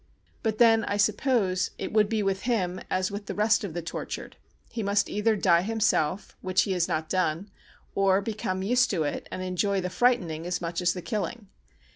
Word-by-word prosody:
But 220 -1 -1
then 225 -1 +5
I 205 - -1
suppose 205 -3 +1
it - - -5
would 210 -1 +4
be 220 -2 0
with 195 -1 0
him 185 -6 0
as 185 +1 0
with 200 0 -6
the - - -4
rest 210 +1 +3
of 180 -5 -5
the 175 - -3
tortured, 165 - -6 0.4
he 230 - -3
must 200 0 +1
either 215 +2 +2
die 175 -4 +4
himself, 200 -4 0
which 185 0 +2
he 195 - -3
has 180 -2 +1
not 155 0 -2
done, 185 +2 -1 0.4
or 195 -1 +3
become 200 -3 -3
used 245 +5 +3
to 170 -6 0
it 145 - -3
and 185 - -4
enjoy 190 +2 0
the 180 -1 -3
frightening 180 -7 +1
as 180 0 -1
much 170 0 -3
as 175 0 +2
the 180 - -7
killing. 210 -1 -4
195 Hz, 200 wpm, -27 LUFS, 180-215 Hz, 0.4 s, then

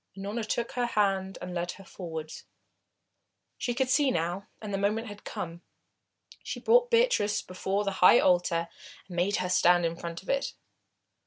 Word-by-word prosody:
Unorna 205 +4 -3
took 235 +2 -2
her 245 -1 -1
hand 195 -4 0
and 180 0 -6
led 175 0 -2
her 195 - -13
forwards. 160 -4 -7 1.1
She 240 -2 -1
could 265 +1 +1
see 285 0 +4
now, 175 -1 -2
and 210 -2 -6
the 195 - 0
moment 210 +3 0
had 205 0 -10
come. 170 0 -6 0.8
She - - -5
brought 485 +1 +4
Beatrice 465 - +2
before 190 +2 -2
the 200 - -1
high 185 +6 +8
altar 175 -3 +2 0.4
and 180 - -9
made 185 +4 +1
her 180 0 -1
stand 175 -1 +4
in 165 0 -1
front 170 +1 -7
of - - -13
it. 275 0 0
195 Hz, 170 wpm, -29 LUFS, 175-225 Hz, 1.1 s, high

